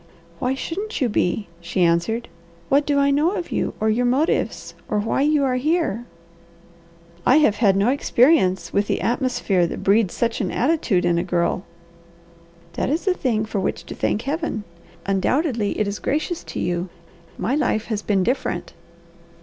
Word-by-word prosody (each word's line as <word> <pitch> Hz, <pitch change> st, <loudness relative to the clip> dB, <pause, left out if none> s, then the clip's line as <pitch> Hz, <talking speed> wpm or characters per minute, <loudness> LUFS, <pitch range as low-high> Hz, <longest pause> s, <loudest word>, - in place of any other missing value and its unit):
"Why 255 Hz, +1 st, 0 dB
shouldn't 400 Hz, +10 st, -4 dB
you 255 Hz, -5 st, +1 dB
be?" 205 Hz, 0 st, 0 dB
she 175 Hz, +2 st, 0 dB
answered. 175 Hz, +8 st, +1 dB, 0.4 s
"What 285 Hz, +2 st, +3 dB
do 290 Hz, -1 st, +2 dB
I 280 Hz, 0 st, +3 dB
know 305 Hz, +6 st, +2 dB
of 350 Hz, -, -5 dB
you -, -, -1 dB
or 220 Hz, -, 0 dB
your 240 Hz, +3 st, +2 dB
motives 275 Hz, +7 st, 0 dB, 0.2 s
or 210 Hz, -, 0 dB
why 215 Hz, +5 st, 0 dB
you 295 Hz, 0 st, +3 dB
are 255 Hz, -2 st, +1 dB
here?" 300 Hz, -, 0 dB, 1.2 s
"I 255 Hz, -, +5 dB
have 260 Hz, -10 st, +3 dB
had 200 Hz, -4 st, +4 dB
no 200 Hz, +4 st, +3 dB
experience 235 Hz, -, +3 dB
with 200 Hz, +1 st, +1 dB
the -, -, 0 dB
atmosphere 230 Hz, -7 st, +1 dB
that -, -, -6 dB
breeds 200 Hz, -1 st, +3 dB
such 230 Hz, -1 st, 0 dB
an 190 Hz, -, -1 dB
attitude 245 Hz, -, +1 dB
in 170 Hz, -1 st, +2 dB
a -, -, 0 dB
girl." 175 Hz, 0 st, 0 dB, 1.1 s
"That -, -, -1 dB
is 320 Hz, +7 st, -1 dB
a 375 Hz, -, +4 dB
thing 230 Hz, -10 st, 0 dB
for 215 Hz, -2 st, -3 dB
which -, -, -2 dB
to -, -, -8 dB
thank 215 Hz, -, -1 dB
Heaven. 290 Hz, -6 st, -2 dB, 0.4 s
Undoubtedly 220 Hz, -, 0 dB
it 215 Hz, -, +1 dB
is 200 Hz, 0 st, -3 dB
gracious 315 Hz, +4 st, -2 dB
to -, -, -6 dB
you. 175 Hz, +1 st, -2 dB, 0.5 s
My 225 Hz, +8 st, -1 dB
life 250 Hz, -7 st, +1 dB
has 215 Hz, -3 st, -3 dB
been 200 Hz, -3 st, +1 dB
different." 250 Hz, +7 st, -2 dB
230 Hz, 175 wpm, -22 LUFS, 195-285 Hz, 1.2 s, I